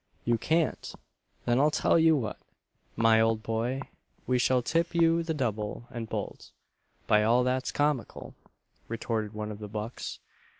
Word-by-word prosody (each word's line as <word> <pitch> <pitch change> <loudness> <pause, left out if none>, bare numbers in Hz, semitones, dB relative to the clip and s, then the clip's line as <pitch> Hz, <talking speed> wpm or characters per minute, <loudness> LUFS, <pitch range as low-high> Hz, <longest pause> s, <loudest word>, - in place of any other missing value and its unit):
"You 115 -1 +2
can't! 160 +4 0 0.5
then 120 +1 +2
I'll 150 +2 +5
tell 160 - +3
you 160 -1 +5
what, 110 -6 -4 0.6
my 115 0 +4
old 110 -1 +1
boy, 115 +4 -1 0.4
we 125 -1 +1
shall 125 0 +2
tip 170 +6 0
you 165 0 +4
the 165 -1 -2
double 110 -4 -3
and 115 -3 -6
bolt, - - -5 0.6
by 105 - +4
all 120 +3 +4
that's 130 0 0
comical!" 145 -4 -1 0.5
retorted 115 -2 -3
one 105 0 -4
of 105 - -8
the 105 - -6
bucks. 110 +3 -5
120 Hz, 155 wpm, -29 LUFS, 110-145 Hz, 0.6 s, I'll